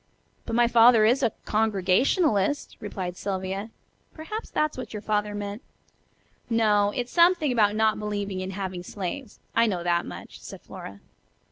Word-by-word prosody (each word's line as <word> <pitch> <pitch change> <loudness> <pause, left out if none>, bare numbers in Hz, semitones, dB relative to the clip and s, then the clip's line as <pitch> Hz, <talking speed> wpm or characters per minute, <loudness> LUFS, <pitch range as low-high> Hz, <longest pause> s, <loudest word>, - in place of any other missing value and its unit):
But 225 - -2
my 240 0 +4
father 230 -1 +6
is 245 +5 +3
a 235 -4 +2
Congregationalist," 215 - +1
replied 185 -4 -5
Sylvia. 195 +2 -4 0.5
"Perhaps 425 +8 -6
that's 305 0 0
what 255 -2 -7
your 210 - -5
father 210 -1 -1
meant." 205 +2 -5 0.9
"No, 210 -3 +3
it's 245 0 -3
something 340 -4 +4
about 210 -4 +3
not 220 -1 +2
believing 205 -2 -3
in 185 0 -4
having 190 -2 -4
slaves, 200 +8 -6 0.2
I 230 0 +4
know 180 -5 -2
that 175 0 +1
much," - - -9
said - - -10
Flora. 100 0 -10
210 Hz, 150 wpm, -26 LUFS, 195-240 Hz, 0.9 s, father